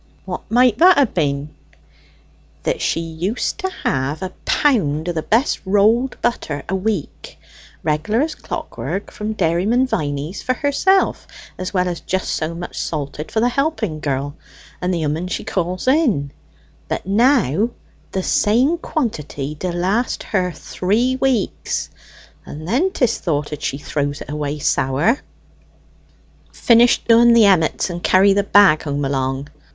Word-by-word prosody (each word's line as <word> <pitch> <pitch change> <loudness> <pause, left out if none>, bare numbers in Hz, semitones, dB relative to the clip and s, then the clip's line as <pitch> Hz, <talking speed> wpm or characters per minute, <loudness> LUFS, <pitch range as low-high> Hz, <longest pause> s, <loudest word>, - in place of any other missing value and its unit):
"What - - -6
might 245 -1 +3
that 365 +1 +7
ha' 275 -5 +3
been?" 145 -3 -1 1.1
"That - - -1
she - - 0
used 165 +7 -3
to 380 - -1
have 140 +5 -1
a 185 0 -5
pound 175 - +1
o' - - +1
the 165 -2 -2
best 230 - +1
rolled 215 +6 +2
butter 155 -12 -2
a 180 - -3
week, 190 -4 -4 0.5
regular 160 - 0
as 310 +1 -1
clockwork, 200 - -5
from 210 +1 -4
Dairyman 195 +7 +1
Viney's 150 - -3
for 255 - 0
herself, 370 +9 +1 0.3
as 185 +1 -4
well 180 -2 +1
as 175 -2 -3
just 190 0 -2
so 160 +2 -2
much 175 +1 -6
salted 150 0 -4
for 220 - 0
the 240 - +3
helping 245 - -1
girl, 140 0 -2 0.5
and 180 0 0
the 170 -3 -1
'ooman 155 +4 -2
she 185 - -3
calls 180 +3 -3
in; 250 - +2 0.6
but - - -3
now 220 - +3 0.4
the 190 - -2
same 255 - +2
quantity 150 - -3
d'last 185 +8 -1
her 185 -3 -1
three 215 - -1
weeks, 260 -6 -1 0.5
and 155 +2 -9
then 270 - +2
'tis 245 - 0
thoughted 150 -3 -2
she 140 - -2
throws 145 0 -3
it - - -7
away 150 0 -3
sour." 145 - +1 1.3
"Finish 235 0 +4
doing 235 0 +6
the 230 -2 +6
emmets, 185 -2 +2
and 175 0 -5
carry 195 +2 +5
the 200 - +2
bag 200 -5 +5
home 145 -1 -2
along." 135 0 -2
185 Hz, 145 wpm, -19 LUFS, 150-235 Hz, 1.3 s, that